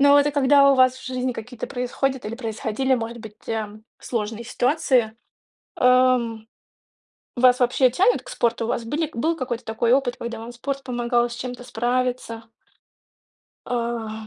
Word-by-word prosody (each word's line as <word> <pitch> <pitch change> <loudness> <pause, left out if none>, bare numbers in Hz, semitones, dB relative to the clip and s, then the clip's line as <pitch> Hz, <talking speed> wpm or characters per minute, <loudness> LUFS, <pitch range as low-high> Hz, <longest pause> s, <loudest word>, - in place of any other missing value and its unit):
Ну 285 0 +7
это 285 +1 +3
когда 280 0 +5
у - - +3
вас 255 -1 +4
в - - -13
жизни 255 0 -2
какие-то 235 +1 -7
происходят 260 +1 -2
или 215 - -4
происходили, 235 +2 -1
может 235 -1 -4
быть, 220 -2 -13
э, 215 -1 -4 0.2
сложные 225 0 -4
ситуации, 245 -3 +1 0.6
эм, 250 -3 +3 0.9
вас 250 0 +5
вообще 250 +1 +3
тянет 390 - +3
к - - -12
спорту? 235 - 0
У - - -4
вас 235 - -1
были 300 +6 -2
был 320 +8 0
какой-то 245 -4 -4
такой 230 +2 +1
опыт, 260 -2 +1
когда 235 0 -6
спорт 270 +3 -5
помогал 240 -1 0
с 235 - -7
чем-то 250 0 -6
справиться? 245 -1 -2 1.2
А. 230 -2 -3
245 Hz, 150 wpm, -23 LUFS, 230-260 Hz, 1.2 s, Ну